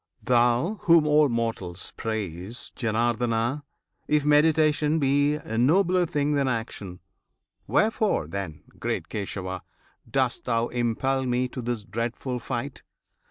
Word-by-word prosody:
Thou 125 - +2
whom 165 -3 +6
all 150 -1 +4
mortals 115 -7 -2
praise, 105 -1 -4
Janardana! 120 +3 0 0.5
If 150 -1 +2
meditation 150 0 +4
be 145 0 +2
a 115 -7 -4
nobler 180 +6 +3
thing 145 -1 0
Than 140 -2 +1
action, 110 -6 -4 0.7
wherefore, 215 - +2
then, 80 -3 -6 0.2
great - - -3
Kesava! 95 -2 -4 0.5
Dost - - 0
thou 115 0 0
impel 130 +3 0
me 125 +1 +1
to 125 - -6
this 120 -2 -3
dreadful 120 +4 -3
fight? 130 +3 -4
125 Hz, 115 wpm, -26 LUFS, 115-150 Hz, 0.7 s, whom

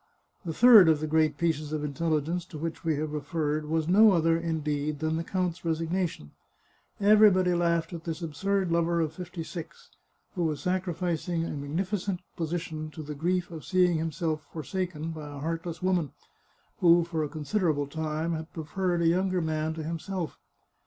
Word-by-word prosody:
The 170 - -3
third 215 -1 +8
of 155 -2 +4
the 155 - -2
great 155 -1 +2
pieces 155 -2 -1
of 155 -1 -2
intelligence 160 +3 -1
to 165 - -9
which 165 +1 -5
we 160 -2 +1
have 150 +1 -3
referred 150 0 -2
was 160 0 0
no 205 +3 +7
other, 165 -1 +3
indeed, 155 -3 -2
than 160 +2 -1
the 165 - -2
count's 180 -1 -2
resignation. 165 - -2 0.7
Everybody 200 -3 +5
laughed 170 -1 +1
at 165 -1 -6
this 165 +1 -4
absurd 190 +4 -1
lover 170 0 +2
of 160 -2 0
fifty 175 0 -6
six, 165 0 -9 0.4
who 175 -3 -1
was 155 -3 -1
sacrificing 175 -2 -1
a - - -4
magnificent 175 +6 -2 0.2
position 160 -2 -3
to 155 0 -8
the 150 +1 -6
grief 175 +4 -1
of 160 -2 -7
seeing 180 -3 +3
himself 160 -1 -2
forsaken 165 0 -4
by 155 -2 -7
a 145 - -8
heart 165 +3 -3
less 170 0 -6
woman, 180 -6 +1 0.7
who, 170 -1 +6
for 165 -2 -2
a 150 - -3
considerable 155 -1 0
time, 155 +2 -2
had 160 0 -5
preferred 175 +2 -1
a - - +4
younger 185 +2 +2
man 160 -1 -1
to 160 - -5
himself. 165 +2 -4
165 Hz, 175 wpm, -28 LUFS, 155-180 Hz, 0.7 s, third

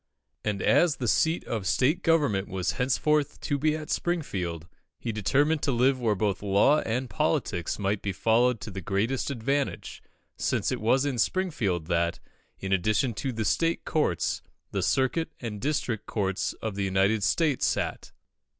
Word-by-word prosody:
And 105 -2 -2
as 170 -4 +4
the 125 - -3
seat 160 +8 +2
of 110 -5 -3
State 130 - +2
Government 145 - +2
was 95 -2 -1
henceforth 140 +3 +1
to 145 -2 -1
be 155 +2 +2
at 155 -1 -6
Springfield, 90 - -2 0.3
he 115 - -3
determined 145 - +1
to 140 - +1
live 130 +2 +2
where 110 -4 +1
both 100 0 -1
law 105 +9 +4
and 125 +2 -2
politics 145 - -1
might 100 0 -1
be 100 - -2
followed 115 +5 +2
to 110 - -6
the 95 0 -6
greatest 110 - -1
advantage, 140 +2 -2 0.4
since - - 0
it - - -3
was 130 +5 +3
in 135 -4 -1
Springfield 110 - 0
that, 85 0 0 0.4
in 95 0 -2
addition 105 +6 +1
to 110 +6 -3
the 115 -2 -3
State 165 +7 +1
Courts, 150 - 0 0.3
the - - -1
Circuit 135 +5 +1
and 105 -4 -5
District 130 -7 -2
Courts 95 -2 -1
of 110 -2 -2
the 100 0 -2
United 95 +3 +2
States 150 +5 +2
sat. - - -2
115 Hz, 165 wpm, -27 LUFS, 100-145 Hz, 0.4 s, as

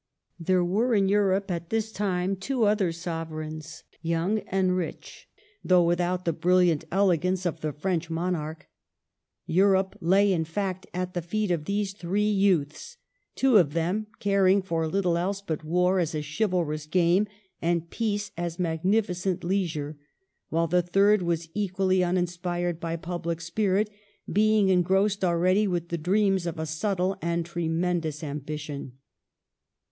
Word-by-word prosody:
There 180 +1 +2
were 220 +7 +1
in 195 -2 +3
Europe 195 -1 +2
at 170 -1 -4
this 220 0 -1
time 190 -2 -1
two 240 +6 -1
other 205 -4 +2
sovereigns, 160 -2 -6 0.2
young 170 +6 0
and 185 -1 +1
rich, 180 -3 -6 0.3
though 180 -1 +5
without 175 +1 0
the 170 - +1
brilliant 175 -1 +2
elegance 185 -1 +2
of 165 -2 -2
the 155 - -1
French 165 +2 -2
monarch. 165 -2 -3 0.8
Europe 190 +2 +3
lay, 195 +4 +4
in 165 -3 +1
fact, 185 +3 -3
at 180 +1 -3
the 175 - -2
feet 205 +4 -1
of 160 -3 -1
these 200 +1 -1
three 195 +3 -1
youths, 195 - 0 0.4
two 260 -4 +4
of 155 -7 +3
them 180 +6 -1
caring 195 -1 +3
for 165 -3 -1
little 175 0 +1
else 195 +3 -1
but 160 -6 -4
war 180 +4 +2
as 165 -2 -1
a 150 - -2
chivalrous 155 -2 -1
game 180 +4 +3 0.3
and 170 0 -1
peace 205 -3 -2
as 170 0 -4
magnificent 180 +1 0
leisure; 160 -6 -2 0.5
while 165 +1 +1
the 180 +2 +2
third 195 +4 +3
was 170 -1 -1
equally 190 -2 +1
uninspired 175 -1 -1
by 165 -1 -3
public 170 0 -4
spirit, 195 +4 0 0.5
being 215 -1 +4
engrossed 190 +3 +2
already 185 +4 +3
with 175 -2 -2
the 170 - -1
dreams 190 +1 +2
of 165 - -4
a 160 - -2
subtle 185 +4 -1
and 170 0 -1
tremendous 170 -2 -2
ambition. 150 -2 -5
180 Hz, 145 wpm, -26 LUFS, 165-195 Hz, 0.8 s, though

